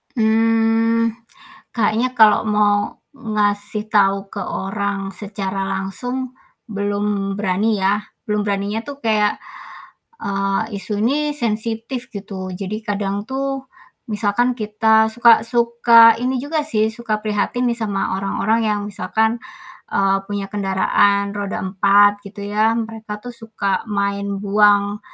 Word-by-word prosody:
Mmm, 225 0 +2 0.6
kayaknya 230 +2 0
kalau 220 -4 +5
mau 210 -1 +1 0.2
ngasih 210 -3 -1
tahu 200 -2 +2
ke 200 - -4
orang 200 +1 -3 0.2
secara 195 -1 -4
langsung, 245 +7 -4 0.3
belum 205 -1 -2
berani 210 +2 0
ya. 200 +2 +1 0.2
Belum 210 -1 0
beraninya 205 +2 -2
tuh 285 +1 -9
kayak, 215 -4 +1 0.8
eee, 195 +2 -2
isu 205 +1 -2
ini 295 +6 +1
sensitif, 230 0 -2
gitu. 195 -2 -6
Jadi 200 +4 -5
kadang 200 0 -2
tuh 270 +2 -3 0.5
misalkan 215 +4 +1
kita 220 0 +2
suka 235 0 +6
suka 235 -1 +5
ini 250 +1 -1
juga 300 +3 -2
sih 220 -7 +1
suka 220 -1 -3
prihatin 215 +4 -1
nih 235 - -1
sama 205 -4 -2
orang-orang 200 +3 0
yang 210 -1 0
misalkan, 220 +2 0 0.5
eee, 195 0 +2
punya 205 -1 -3
kendaraan 200 0 +1
roda 200 -2 -3
4, 200 +2 +4
gitu 200 0 -9
ya, 215 +2 +1
mereka 225 -2 -5
tuh 245 - -6
suka 220 -4 -3
main 200 -1 -2
buang 205 0 +3
210 Hz, 120 wpm, -19 LUFS, 200-230 Hz, 0.8 s, suka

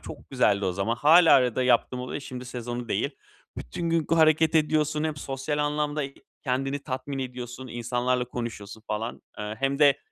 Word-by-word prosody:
Çok - - -11
güzeldi 100 0 +2
o 95 - 0
zaman. 100 +5 -1
Hâlâ 160 +5 +7
arada 125 -1 +3
yaptığım 125 0 +2
oluyor, 125 +3 -5
şimdi 125 -2 -7
sezonu 120 -1 -5
değil. - - 0 0.5
Bütün 165 - -4
gün 165 -2 +1
g - - +3
hareket 160 0 +4
ediyorsun. 155 -1 +2
Hem 155 -2 -2
sosyal 140 +2 -3
anlamda, 150 0 0
eee, 135 0 -6 0.3
kendini 135 +2 -1
tatmin 135 0 -4
ediyorsun. 125 0 -6
İnsanlarla 120 +2 -1
konuşuyorsun 115 -3 -6
falan. 110 +2 -4 0.2
Eee, 105 +1 -4
hem 135 +1 0
de 145 -2 +5
130 Hz, 170 wpm, -26 LUFS, 120-150 Hz, 0.5 s, Hâlâ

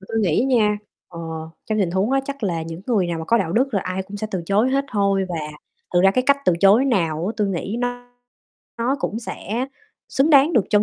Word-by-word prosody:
Mà - - -14
tui 225 - 0
nghĩ 195 +4 +2
nha, 215 -5 +3 0.3
ờ, 170 - -10 0.5
trong 215 -1 -1
tình 185 -4 +1
huống 190 +6 0
á, 270 0 +3
chắc 280 -1 -6
là 170 -5 -1
những 165 +1 -7
người 210 -7 +2
nào 170 -1 -3
mà 160 - -5
có 235 +8 +3
đạo 175 -6 -1
đức 255 +4 +1
là 195 - +2
ai 185 +1 -3
cũng 200 +2 -9
sẽ 215 +1 -3
từ 185 -3 -3
chối 210 +7 +2
hết 275 +1 +1
thôi. 200 -2 +2
Và 175 - -4 0.6
thực 175 - +5
ra 195 - +6
cái 255 +6 +1
cách 280 0 +5
từ - - +4
chối 200 +6 +6
nào 170 - 0
á, 215 - -1
tui 210 -2 +1
nghĩ 195 +4 -3
nó 245 0 -3 0.7
nó 250 +4 +1
cũng 225 - -2
sẽ 235 +1 -4 0.4
xứng 275 +4 +2
đáng 285 +2 +6
được 230 - +3
trân 210 0 +4
210 Hz, 250 wpm, -21 LUFS, 190-245 Hz, 0.7 s, ra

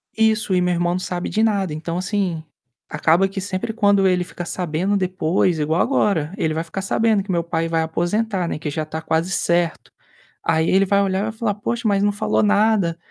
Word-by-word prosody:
Isso, 220 -3 +2
e 180 - +3
meu 180 0 +1
irmão 175 0 0
não 185 - -1
sabe 180 -1 -3
de 215 - 0
nada. 200 -7 +1
Então, 165 +2 -4
assim, 185 -4 -2 0.4
acaba 170 +4 +2
que 195 0 -5
sempre 200 +4 -3
quando 200 -3 +3
ele 180 -1 +2
fica 175 -1 -7
sabendo 180 +3 -1
depois 180 -2 +1
igual 155 +3 +1
agora, 195 - +1
ele 160 -5 0
vai 160 - -2
ficar 180 +4 -6
sabendo 215 0 +1
que 195 - -5
meu 170 -1 0
pai 165 -1 -2
vai 165 0 0
aposentar, 180 +4 -1
né, 155 - -4
que 155 - -4
já 155 +1 -3
tá 160 +1 -6
quase 165 +4 -1
certo. 170 -2 0 0.5
Aí, 160 0 +2
ele 195 +1 +4
vai 200 +1 +2
olhar 190 -1 0
e - - -1
vai 220 - -2
falar: 220 -2 -2
"Poxa, 230 +2 -2
mas 200 -1 +2
não 205 - +3
falou 205 +1 0
nada". 205 -4 +2
185 Hz, 215 wpm, -21 LUFS, 165-205 Hz, 0.5 s, ele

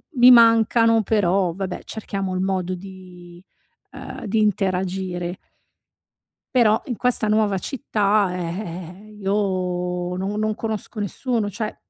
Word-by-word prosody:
mi 250 0 +8
mancano 230 -1 +5
però, 190 -4 +1
vabbè, 190 0 -5
cerchiamo 195 -3 -4
il 185 - -1
modo 185 -1 -1
di, 180 -2 -12 0.5
uhm - - -8
di 215 +1 +1
interagire. 185 -3 -1 1.2
Però 220 -3 +4
in 245 -4 -4
questa 250 -3 +1
nuova 210 -2 +2
città, 205 -3 0
eh - - -3 0.2
eh 180 +1 -8
eh, 215 - -15
io 180 -3 -1
non 195 +3 -3
non 215 0 0
conosco 220 0 -4
nessuno. 215 +1 -1
Cioè, 215 +2 -5
195 Hz, 125 wpm, -22 LUFS, 180-215 Hz, 1.2 s, mi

